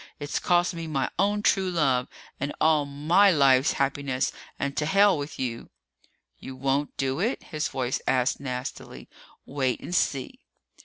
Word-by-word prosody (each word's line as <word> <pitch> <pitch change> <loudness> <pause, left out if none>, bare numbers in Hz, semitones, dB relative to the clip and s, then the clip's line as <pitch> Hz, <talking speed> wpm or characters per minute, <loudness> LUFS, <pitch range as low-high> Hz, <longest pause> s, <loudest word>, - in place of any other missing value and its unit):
It's 145 0 -3
cost 175 0 +2
me 165 -1 -6
my 140 -4 -1
own 205 +2 +1
true 190 -1 +2
love 135 -8 +1 0.3
and 140 +2 -3
all 155 -2 +3
my 155 +8 +4
life's 140 -4 +4
happiness 135 -1 -1 0.3
and 140 0 -3
to 150 - -1
hell 200 +2 +5
with 145 +1 -6
you!" 120 -3 -4 0.7
"You 130 - -8
won't 135 +2 -1
do 135 +1 -1
it?" 225 +8 -1
his 155 -2 -3
own - - -11
voice 130 -1 -1
asked 130 +1 +1
nastily. 125 -1 -6 0.4
"Wait 130 -3 -1
and 175 - -7
see!" 135 -6 -1
145 Hz, 160 wpm, -26 LUFS, 130-170 Hz, 0.7 s, hell